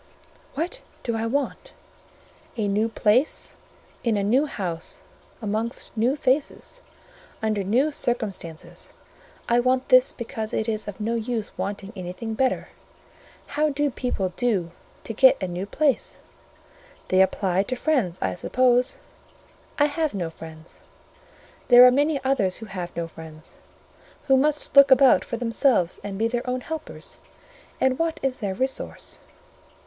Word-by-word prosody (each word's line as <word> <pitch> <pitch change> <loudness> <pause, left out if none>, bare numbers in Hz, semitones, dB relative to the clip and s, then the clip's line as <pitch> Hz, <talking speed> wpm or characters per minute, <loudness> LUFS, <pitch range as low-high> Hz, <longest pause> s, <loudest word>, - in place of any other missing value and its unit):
"What 350 - -3 0.2
do 235 - -1
I 225 0 -1
want? 285 - -3 0.8
A 215 -2 0
new 210 +3 +1
place, 225 +6 +1 0.5
in 230 -4 +1
a 200 - 0
new 255 +9 +3
house, 175 - -4 0.4
amongst 220 +4 -3
new 235 +5 +2
faces, 285 - -1 0.6
under 215 -3 0
new 250 +10 +2
circumstances: 205 - -4 0.5
I 235 +1 +3
want 255 +1 +1
this 255 0 +6
because 220 -2 -5
it 220 - -1
is 215 -1 -2
of 205 0 -7
no 220 +2 -1
use 230 -1 -3
wanting 200 +1 -5
anything 185 +5 -5
better. 260 +3 0 0.8
How 300 +1 0
do 290 0 0
people 240 -7 -2
do 200 -9 0 0.3
to 225 - -5
get 260 +4 +6
a 185 - -2
new 180 +2 -4
place? 285 +3 0 0.9
They 185 0 +5
apply 190 -1 +2
to 255 +6 -3
friends, 245 - 0
I 95 -1 0
suppose: 250 - +2 0.8
I 290 - +5
have 300 -2 -1
no 175 -4 -3
friends. 160 0 -12 0.9
There 245 0 +9
are 250 - +8
many 290 +2 +2
others 235 -9 +1
who 225 - -8
have 180 -4 -6
no 170 -1 -2
friends, 160 -1 -11 0.7
who 270 -2 +4
must 295 +3 +1
look 280 0 +9
about 265 0 +6
for 235 - -4
themselves 230 - +2
and 200 -1 -5
be 225 +2 +2
their 240 +1 -3
own 255 0 -1
helpers; 315 +3 -8 0.6
and 260 -1 +2
what 330 -1 -1
is 265 -1 -1
their 200 -4 -2
resource?" 260 +3 -3
235 Hz, 145 wpm, -24 LUFS, 200-265 Hz, 0.9 s, There